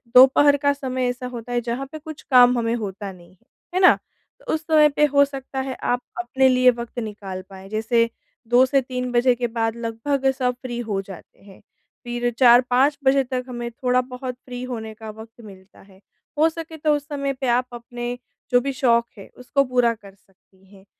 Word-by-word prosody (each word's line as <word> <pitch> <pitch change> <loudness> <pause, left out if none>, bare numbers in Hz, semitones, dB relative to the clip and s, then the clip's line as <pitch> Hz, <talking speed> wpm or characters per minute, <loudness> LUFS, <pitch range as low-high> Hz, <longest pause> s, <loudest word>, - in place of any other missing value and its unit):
दोपहर 270 +3 +7
का 285 0 +2
समय 260 -3 -2
ऐसा 250 +1 -5
होता 245 -1 -8
है 240 0 0
जहाँ 240 +3 -3
पे 310 - -7
कुछ 310 -1 -10
काम 250 -1 +7
हमें 230 -1 0
होता 205 -3 -5
नहीं 175 -2 -16
है। 185 +5 -29 0.3
है - - +3
ना? 365 - +7 0.4
तो - - -4
उस 315 - -1
समय 305 -2 +5
पे 295 +1 +2
हो 280 0 +6
सकता 270 -1 -7
है 265 -1 -3
आप 245 0 0 0.2
अपने 260 +2 +2
लिए 255 0 +5
वक़्त 235 0 -7
निकाल 205 -4 -6
पाएँ, 190 0 -12
जैसे 230 +2 +1 0.4
2 245 +2 +5
से 270 +1 +2
3 250 -1 -4
बजे 245 +1 +3
के 240 0 -2
बाद 225 -1 -2
लगभग 235 +4 -1
सब 250 -1 +1
फ्री 245 -2 -5
हो 195 -2 -1
जाते 190 -2 -13
हैं। 195 -1 -16 0.4
फिर 240 0 -2
4-5 250 +3 +5
बजे 270 0 +4
तक 255 0 -3
हमें 240 -1 -5
थोड़ा 250 +1 +1
बहुत 250 0 -7
फ्री 245 -1 -7
होने 225 -3 -6
का 220 - -7
वक़्त 220 +2 -12
मिलता 190 -1 -15
है। 190 -1 -20 0.4
हो 320 +1 +5
सके 325 0 -8
तो 300 0 +2
उस 290 0 -6
समय 280 -2 -2
पे 265 - -1
आप 250 - -1
अपने 240 +1 -6 0.3
जो 245 - +5
भी 275 +2 -2
शौक 235 -3 +2
हैं 195 - -12
उसको 275 +3 0
पूरा 245 -3 +2
कर 205 -3 -15
सकती 195 0 -28
हैं। 190 0 -18
245 Hz, 205 wpm, -22 LUFS, 225-265 Hz, 0.4 s, दोपहर